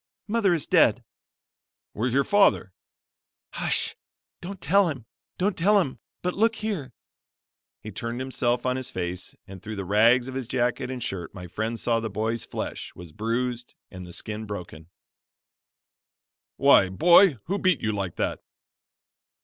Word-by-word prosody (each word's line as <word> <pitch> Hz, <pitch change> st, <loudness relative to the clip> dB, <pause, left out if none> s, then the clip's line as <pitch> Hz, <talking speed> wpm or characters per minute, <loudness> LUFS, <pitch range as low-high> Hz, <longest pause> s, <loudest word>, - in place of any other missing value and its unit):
"Mother 210 Hz, -3 st, +2 dB
is 165 Hz, -5 st, +1 dB
dead." -, -, +4 dB, 0.9 s
"Where's 120 Hz, +3 st, -1 dB
your 140 Hz, -, +4 dB
father?" 200 Hz, -, +3 dB, 0.8 s
"Hush! -, -, 0 dB, 0.5 s
don't 190 Hz, +2 st, -7 dB
tell 180 Hz, +4 st, +3 dB
him! 130 Hz, -7 st, -6 dB, 0.3 s
don't 190 Hz, +1 st, 0 dB
tell 205 Hz, +5 st, +4 dB
him! 140 Hz, -9 st, -2 dB, 0.2 s
but 180 Hz, 0 st, 0 dB
look 225 Hz, +3 st, +2 dB
here!" 200 Hz, -, -4 dB, 0.9 s
He 105 Hz, -, -7 dB
turned 115 Hz, +4 st, -5 dB
himself 125 Hz, -2 st, -1 dB
on 130 Hz, 0 st, +1 dB
his 130 Hz, -1 st, -3 dB
face 90 Hz, 0 st, -5 dB
and 95 Hz, -1 st, -11 dB
through 110 Hz, +2 st, -6 dB
the 100 Hz, -2 st, -5 dB
rags 115 Hz, +6 st, +4 dB
of 130 Hz, -, -6 dB
his 130 Hz, -3 st, -4 dB
jacket 125 Hz, 0 st, -1 dB
and 130 Hz, -3 st, -4 dB
shirt 90 Hz, -3 st, -5 dB
my 90 Hz, -2 st, -8 dB
friend 110 Hz, +6 st, -3 dB
saw 115 Hz, -1 st, +1 dB
the 110 Hz, -1 st, -4 dB
boy's 110 Hz, +3 st, -2 dB
flesh -, -, -5 dB
was 85 Hz, -2 st, -11 dB
bruised 120 Hz, +5 st, -3 dB, 0.2 s
and 95 Hz, -1 st, -8 dB
the 90 Hz, -, -10 dB
skin 110 Hz, +4 st, -4 dB
broken. 85 Hz, -5 st, -8 dB, 1.7 s
"Why, 95 Hz, -, +6 dB
boy, 170 Hz, -, +6 dB
who 200 Hz, +4 st, -1 dB
beat 185 Hz, -7 st, +2 dB
you 110 Hz, -, 0 dB
like 100 Hz, -4 st, -3 dB
that?" -, -, -2 dB
120 Hz, 155 wpm, -26 LUFS, 105-165 Hz, 1.7 s, Why